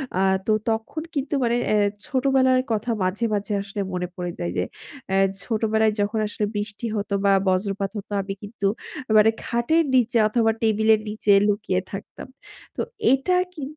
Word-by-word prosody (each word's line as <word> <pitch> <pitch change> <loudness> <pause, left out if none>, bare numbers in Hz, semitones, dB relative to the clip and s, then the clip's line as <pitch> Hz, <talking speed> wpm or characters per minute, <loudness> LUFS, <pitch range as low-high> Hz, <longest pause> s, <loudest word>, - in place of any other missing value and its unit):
আ - - +1 0.3
তো - - +1 0.2
তখন 225 +8 -2
কিন্তু 280 +1 -2
মানে 235 0 +2 0.2
এ্যা 205 -1 +3 0.2
ছোটোবেলার 260 -1 +3
কথা 225 +2 0
মাঝে, 190 +6 0
মাঝে, 205 +1 -2
আসলে 200 0 -5
মনে 180 0 -2
পড়ে 175 -1 -4
যায় 85 0 -2
যে, 90 - +2 0.5
অ্যা 190 - +1 0.3
ছোটোবেলায় 220 -1 +1
যখন 205 +2 0
আসলে 210 0 -2
বৃষ্টি 205 +2 -4
হতো 200 0 -3
বা 200 - +5 0.2
বজ্রপাত 195 +1 0
হতো 205 - -8
আমি 195 0 -5
কিন্তু 205 -1 -5 0.5
মানে 215 +1 +6
খাটের 240 +8 +2
নিচে 240 -1 +3
অথবা 225 0 +2
টেবিলের 220 0 +3
নিচে 210 -1 0 0.2
লুকিয়ে 205 -3 0
থাকতাম। 195 - -8 0.5
তো - - -2 0.3
এটা 270 +7 +1 0.2
কি 310 -5 -7
215 Hz, 160 wpm, -23 LUFS, 200-235 Hz, 0.5 s, মানে